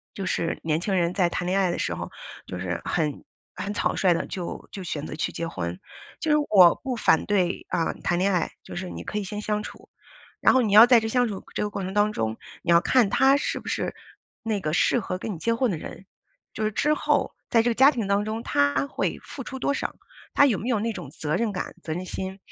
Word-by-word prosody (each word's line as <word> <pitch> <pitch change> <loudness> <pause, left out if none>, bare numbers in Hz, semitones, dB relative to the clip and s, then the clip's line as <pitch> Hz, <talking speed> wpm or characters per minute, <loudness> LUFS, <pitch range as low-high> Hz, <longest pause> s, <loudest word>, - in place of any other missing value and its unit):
就 195 - -4
是 165 -2 -1
年 160 0 0
轻 195 +2 -1
人 175 -1 +1
在 180 -3 +3
谈 175 +1 -3
恋 185 +2 +1
爱 185 -2 +2
的 - - -2
时 - - -1
候， - - -6 0.4
就 90 - -6
是 90 -1 -3
很 150 -4 -1 0.3
很 205 - -4
草 - - 0
率 185 -2 +4
地 - - -2
就 180 -3 -6
就 195 - -6
选 155 -3 -4
择 - - -6
去 155 - -2
结 170 - -4
婚。 90 - -5 0.4
就 315 - -1
是 300 - +5
我 180 -5 +8
不 260 -2 -2
反 - - +3
对， 190 -4 0
啊， 165 - 0
谈 175 - +1
恋 195 +2 +2
爱， 180 -3 0
就 - - -9
是 180 +1 -4
你 - - -7
可 210 - -3
以 205 - -3
先 205 +2 -5
相 210 0 -1
处， - - -11 0.5
然 - - +5
后 260 - +5
你 215 -4 0
要 215 +3 +10
在 245 -2 +6
这 220 - -3
相 245 +1 +2
处 200 -3 -6
这 - - -1
个 210 - 0
过 200 - -4
程 185 0 -4
当 210 +1 +3
中， 110 - -2 0.3
你 - - -1
要 170 0 +7
看 245 +2 +3
他 270 +4 +5
是 285 - -2
不 - - -9
是 - - -2 0.5
那 220 -3 -1
个 155 -4 -2
适 195 +7 +3
合 185 -3 -4
跟 205 +2 -4
你 - - -8
结 230 +7 +1
婚 240 +1 +1
的 180 - -1
人， 180 - -9 0.5
就 215 - -2
是 215 - +1
之 300 +8 +2
后 - - +1 0.2
在 230 - +5
这 240 - +1
个 - - 0
家 265 +4 +7
庭 235 -8 -3
当 200 +1 +2
中， 220 +1 -3
他 145 - +1
会 - - -2
付 - - -8
出 265 - -6
多 275 - 0
少， - - -3 0.4
他 - - +6
有 225 -9 +1
没 230 - -4
有 235 -4 +2
那 230 +2 -1
种 145 - -7
责 155 +1 -2
任 225 0 0
感、 180 - -5
责 160 - -4
任 180 +2 -4
心， 190 +1 -5
195 Hz, 275 characters per minute, -25 LUFS, 170-225 Hz, 0.5 s, 要